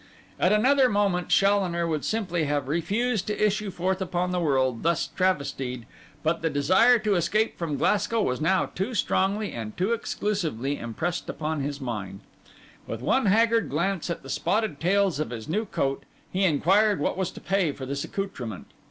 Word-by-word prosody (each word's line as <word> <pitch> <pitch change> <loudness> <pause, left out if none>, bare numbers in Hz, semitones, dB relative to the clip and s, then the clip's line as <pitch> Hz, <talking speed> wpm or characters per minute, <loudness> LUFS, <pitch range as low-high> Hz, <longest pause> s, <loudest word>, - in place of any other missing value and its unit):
At - - +3
another 255 +5 +4
moment 200 -4 +1
Challoner 195 -4 +3
would 155 -3 -2
simply 180 -7 -1
have 145 -2 -1
refused 200 - 0
to 210 - -2
issue 210 0 0
forth 185 +1 -2
upon 180 -1 -1
the 180 - 0
world 130 -7 +1
thus 170 +1 +1
travestied; 140 -9 -1 0.4
but 160 +1 0
the 165 - +1
desire 185 - +4
to 215 -2 0
escape 205 +5 +1
from 160 -4 -2
Glasgow 210 +2 +1
was 125 +3 -1
now 185 +4 +2
too 205 +7 -4
strongly 200 +1 0
and 110 -2 -6
too 190 +6 +1
exclusively 165 - -2
impressed 165 +10 -3
upon 155 -1 -2
his 145 +1 -3
mind. 105 -7 -5 0.7
With 115 0 -5
one 260 - +2
haggard 230 +3 +3
glance 175 +4 -1
at 170 - -4
the - - -10
spotted 215 -8 0
tails 190 -1 +2
of 155 - -2
his 115 -2 -7
new 210 +8 -1
coat, 135 -8 -1 0.3
he 190 +1 +1
inquired 195 +6 +3
what - - 0
was 190 -2 -1
to - - -9
pay 190 -4 +1
for 140 -1 -7
this 140 +1 -3
accoutrement. 125 - -5
180 Hz, 175 wpm, -26 LUFS, 145-205 Hz, 0.7 s, another